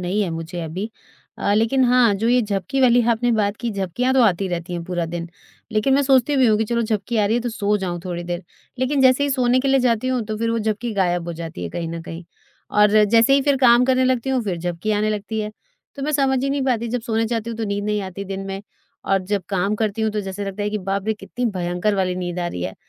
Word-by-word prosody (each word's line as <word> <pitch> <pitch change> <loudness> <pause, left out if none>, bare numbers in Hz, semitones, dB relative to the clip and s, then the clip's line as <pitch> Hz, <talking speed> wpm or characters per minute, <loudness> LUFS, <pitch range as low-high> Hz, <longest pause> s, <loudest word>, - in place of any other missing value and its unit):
नहीं 185 +4 -1
है 180 - -2
मुझे 165 +1 -5
अभी। 185 +8 -5 0.5
अ, 200 - +1
लेकिन 230 +5 +3
हाँ, 245 -4 +4
जो 225 +4 0
ये 250 0 +4
झपकी 210 +6 -2
वाली 245 -1 +5
आपने 235 +1 +2
बात 210 -1 +1
की, 235 -1 -3
झपकियाँ 200 +6 -1
तो 260 - +5
आती 195 -2 +2
रहती 175 0 -4
हैं 170 -1 -3
पूरा 175 -2 -2
दिन। 170 0 -5 0.4
लेकिन 240 +5 +2
मैं 285 - +3
सोचती 270 +1 +3
भी 260 -2 +5
हूँ 215 -1 +4
कि 220 - +1
चलो 235 +1 0
झपकी 215 +1 -2
आ 210 -1 +3
रही 220 - +1
है - - 0
तो 245 - -2
सो 210 -2 0
जाऊँ 175 -2 -3
थोड़ी 175 -1 -4
देर। 175 +1 -4 0.4
लेकिन 270 +2 +1
जैसे 260 +2 +5
ही 285 - 0
सोने 255 -1 +2
के 275 - -1
लिए 270 -1 +4
जाती 245 0 +1
हूँ 255 -3 0
तो 215 -1 -3
फिर 230 0 0
वो 230 - 0
झपकी 220 +2 -2
गायब 175 -3 +1
हो - - -3
जाती 165 - -7
है 85 - -3
कहीं 165 -1 -4
न 165 0 -5
कहीं। 165 0 -8 0.5
और 210 0 +5
ज 215 -1 +6
जैसे 230 +3 +5
ही 275 - +3
फिर 285 -1 +2
काम 245 -1 +5
करने 260 0 +2
लगती 255 0 0
हूँ 255 -3 +1
फिर 180 -4 -2
झपकी 175 +4 -3
आने 210 +1 +1
लगती 215 +1 -3
है। 210 - -4 0.5
तो 275 - -6
मैं 305 +2 -1
समझ 270 -2 +2
ही 275 - 0
नहीं 280 -1 0
पाती 235 -3 0
जब 245 +1 -2
सोने 225 -1 0
जाती 230 0 -2
हूँ 230 - -5
तो 225 - -1
नींद 200 0 -2
नहीं 210 0 0
आती 190 +1 -6
दिन 195 0 -5
में 195 0 -5 0.4
और 195 0 +2
जब 200 0 -1
काम 195 +1 0
करती 215 0 -1
हूँ 220 - +1
तो 210 - -1
जैसे 195 +1 -5
लगता 195 +1 -4
है 210 - -1
कि 210 - -2
बाप 195 +1 -3
रे! 220 - +1
कितनी 245 +4 -6
भयंकर 180 +2 -1
वाली 185 -2 0
नींद 180 -1 -4
आ 175 - -1
रही 90 - -5
है। - - -4
215 Hz, 275 wpm, -21 LUFS, 190-245 Hz, 0.5 s, ज